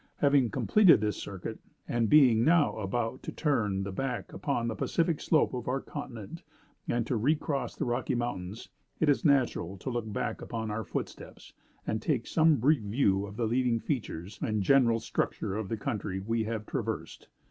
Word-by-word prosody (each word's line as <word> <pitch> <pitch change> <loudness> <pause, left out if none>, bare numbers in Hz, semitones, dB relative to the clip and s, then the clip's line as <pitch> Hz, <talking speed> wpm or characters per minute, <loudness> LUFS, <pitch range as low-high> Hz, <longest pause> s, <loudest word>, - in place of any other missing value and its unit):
Having 140 -4 +3
completed 190 - +5
this 105 0 -1
circuit, 95 -3 -6 0.3
and 115 -2 0
being 125 -7 +6
now 160 +1 +4
about 115 +4 -2
to - - -6
turn 105 -11 0
the 100 - -4
back 125 +4 -4
upon 120 -5 -1
the 115 - -1
Pacific 165 - 0
slope 155 -4 +2
of 125 -2 -5
our 130 +2 0
continent, 120 +5 -8 0.5
and 120 -1 0
to 125 - -1
recross 140 +4 0
the - - -2
Rocky 125 +2 -1
Mountains, 110 -4 -4 0.3
it 160 - +3
is 145 - +2
natural 125 - +2
to 130 - -5
look 120 -3 -3
back - - -3
upon 110 -2 -4
our 110 +1 -2
footsteps, 90 - -7 0.3
and 110 +1 -2
take 125 -5 0
some 160 -1 +4
brief 140 +2 +3
view 100 -2 +1
of 100 +1 -10
the 120 - 0
leading 120 0 +1
features 105 - -4
and 110 -2 0
general 120 -1 +4
structure 100 -2 -2
of 105 -3 -3
the 115 - -2
country 105 -5 -3
we 110 +3 -1
have 110 -1 -3
traversed. - - -4
115 Hz, 180 wpm, -29 LUFS, 105-135 Hz, 0.5 s, being